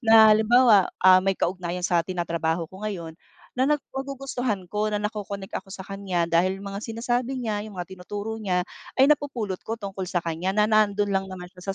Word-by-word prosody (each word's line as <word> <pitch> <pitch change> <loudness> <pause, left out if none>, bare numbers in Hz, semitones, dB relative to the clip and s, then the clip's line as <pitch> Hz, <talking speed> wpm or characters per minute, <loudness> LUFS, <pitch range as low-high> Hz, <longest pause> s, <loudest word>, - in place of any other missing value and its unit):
na, 220 -2 +7
halimbawa, 220 -2 +5 0.2
ah, 185 0 +8
may 195 0 0
kaugnayan 180 0 -2
sa 175 -1 +3
tinatrabaho 170 -1 -2
ko 190 +3 -9
ngayon 170 -5 -6 0.5
na 260 - +3
na 300 - +4 0.2
magugustuhan 260 -8 -4
ko 210 +1 0
na 210 -1 -1
nako-connect 205 -2 -4
ako - - -15
sa 190 - -7
kanya 190 -3 -2
dahil 185 +3 +2
mga 200 0 -5
sinasabi 240 +4 -2
niya, 210 -2 -2
yung 215 - -10
mga 180 0 -6
tinuturo 205 +4 -5
niya 185 -4 0 0.3
ay 270 +2 +5
napupulot 245 -10 0
ko 225 - -1
tungkol 195 -4 -6
sa 175 -1 -1
kanya 170 +3 -2
na 210 +1 +3
nandun 205 -1 +3
lang 195 0 0
naman 180 -2 -9
siya 190 +1 -6
200 Hz, 190 wpm, -25 LUFS, 180-220 Hz, 0.5 s, ah